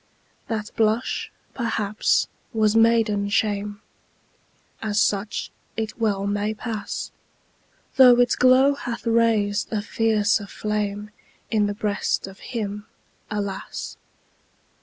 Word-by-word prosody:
That 215 -2 -3
blush, 220 +2 0 0.2
perhaps, 220 -3 +1 0.3
was 215 -1 +2
maiden 225 -3 +3
shame 205 -1 -1 1.0
As 210 -2 0
such 205 -1 0 0.3
it 220 +1 -4
well 200 -3 +1
may 205 +1 -1
pass 215 -1 -5 0.9
Though 250 -2 +8
its 245 0 +4
glow 255 +2 +5
hath 240 -4 -6
raised 225 -3 +2
a 210 -2 -1
fiercer 210 -2 +1
flame 210 0 -3 0.4
In 210 -2 +2
the 205 - -3
breast 205 -1 -1
of 195 0 -11
him, 210 -3 -5 0.4
alas! 200 -2 -4
215 Hz, 105 wpm, -24 LUFS, 205-225 Hz, 1.0 s, Though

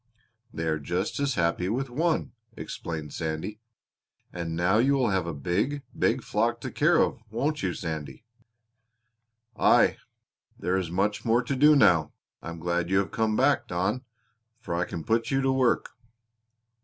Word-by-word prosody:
They 80 - -4
are 80 -1 0
just 90 - -2
as 140 -3 0
happy 85 +1 0
with 130 +5 -1
one," 155 +6 0 0.3
explained 80 -3 -6
Sandy. 80 +7 -4 0.7
"And 85 -2 -4
now 90 +5 +2
you 135 +4 +3
will 125 -5 +1
have 95 -3 0
a - - -2
big, 100 - -1
big - - +1
flock - - 0
to - - -4
take - - -17
care - - +4
of, - - +2
won't 145 +7 -1
you, 90 -3 -1
Sandy?" 80 - -6 1.3
"Aye! - - +4 0.6
There 90 - -1
is 95 -3 -1
much 100 +4 0
more 120 +2 +2
to 135 +3 -2
do 150 +3 +6
now. 85 - +4 0.3
I - - -7
am 85 - -7
glad 85 +1 -1
you 95 - +2
have 100 - 0
come 110 -1 0
back, 135 +4 +2
Don, 95 +8 -1 0.6
for 115 - -5
I 85 +1 0
can 85 - -6
put 115 +4 0
you 135 - +1
to 135 0 +2
work." 130 -2 +1
95 Hz, 170 wpm, -27 LUFS, 85-125 Hz, 1.3 s, do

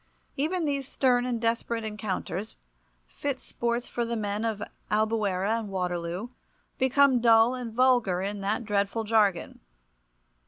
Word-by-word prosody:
Even 325 +5 0
these 280 -2 -1
stern 250 -3 +2
and 240 -2 -1
desperate 230 0 -1
encounters, 210 -2 -4 0.5
fit 280 -2 -4
sports 235 0 -2
for 240 - -2
the 235 0 -2
men 210 0 -2
of 220 -2 -2 0.3
Albuera 215 -1 +1
and 215 -3 -6
Waterloo, 180 +2 -3 0.5
become 265 -1 +4
dull 225 +1 +5
and 250 -3 -5
vulgar, 240 -6 +3
in 200 +1 -3
that 210 +4 -1
dreadful 205 +2 0
jargon. 210 -5 +1
225 Hz, 130 wpm, -27 LUFS, 205-245 Hz, 0.5 s, dull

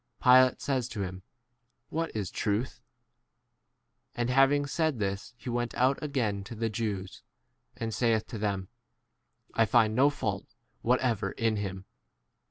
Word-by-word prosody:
Pilate 130 0 +6
says 130 -4 0
to 105 -5 -3
him, 95 0 -6 0.7
What 165 0 -1
is 100 -5 -2
truth? 105 +5 -2 1.3
And 120 +1 0
hav 135 +1 +5
ing 145 0 +1
said 155 0 0
this 100 +3 -3
he - - -12
went 120 0 -2
out 130 +2 +2
again 120 -10 -1
to 115 - -8
the 115 0 -1
Jews, 100 -4 -3 0.6
and 115 -1 -3
saith 115 -2 +2
to 115 - -5
them, 100 -3 -1 0.9
I 115 - +4
■ - - -11
find 110 -2 +4
no 135 +5 +5
fault 105 -9 -4 0.3
whatever 120 -3 +1
in 115 -2 0
him. 95 -2 -4
115 Hz, 150 wpm, -29 LUFS, 105-130 Hz, 1.3 s, Pilate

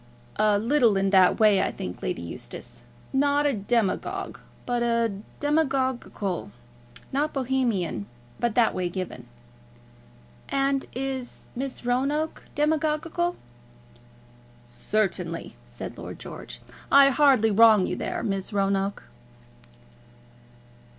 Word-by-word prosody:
"A 210 -1 +4
little 230 -1 +3
in 195 0 +1
that 190 +1 +5
way, 210 -3 +5
I - - 0
think, 90 - -7
Lady - - -3
Eustace; 85 - -9 0.3
not 285 +2 +2
a 285 - +3
demagogue, 210 -2 -1 0.3
but 245 -1 0 0.6
demagognical; 265 - -1 0.6
not 290 +3 +1
a - - -24
Bohemian, 235 - -1 0.3
but 235 -2 0
that 235 -2 +4
way 180 -1 -1
given." 185 0 -6 1.2
"And 275 0 +1
is 260 -1 -5
Miss 260 -1 -5
Roanoke 275 +6 0
demagognical?" 315 +3 0 1.3
"Certainly," 170 - -2
said - - -7
Lord - - -7
George. - - -9 0.3
"I 275 0 +8
hardly 260 -6 +4
wrong 215 -2 +6
you - - -2
there, - - -3
Miss 195 -2 -2
Roanoke?" 195 0 0
240 Hz, 105 wpm, -26 LUFS, 195-275 Hz, 1.3 s, I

